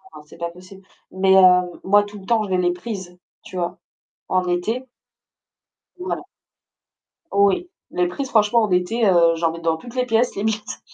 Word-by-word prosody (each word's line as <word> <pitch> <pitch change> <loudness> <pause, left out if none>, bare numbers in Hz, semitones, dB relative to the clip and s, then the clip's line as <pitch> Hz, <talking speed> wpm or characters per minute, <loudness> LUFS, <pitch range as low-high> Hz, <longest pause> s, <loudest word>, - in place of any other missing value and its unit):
Non, - - -11
c'est 150 - -16
pas 170 0 -3
possible 185 +3 -15 0.3
mais 190 0 +3
heu, 180 -2 +5
moi, 205 +2 +4
tout 205 0 -10
le 190 - -14
temps, 225 0 +2
je 205 - -6
mets 185 - +1
les 175 -1 +1
prises, 180 -1 -7 0.3
tu 185 - -9
vois? 175 0 -3 0.5
En 185 -1 +1
été. 215 +9 -1 1.1
Voilà. 360 0 -4 1.1
Oui, 200 - +2 0.2
les 180 0 +1
prises, 265 +10 -5
franchement, 225 0 +3
en 210 - -1
été, 180 +6 +1
heu, 170 -3 +4
j'en 165 0 0
mets 165 - -8
dans 165 -1 0
toutes 240 +9 -12
les 250 -1 +1
pièces 235 0 +1
limite. 215 +1 -3
190 Hz, 180 wpm, -21 LUFS, 180-220 Hz, 1.1 s, heu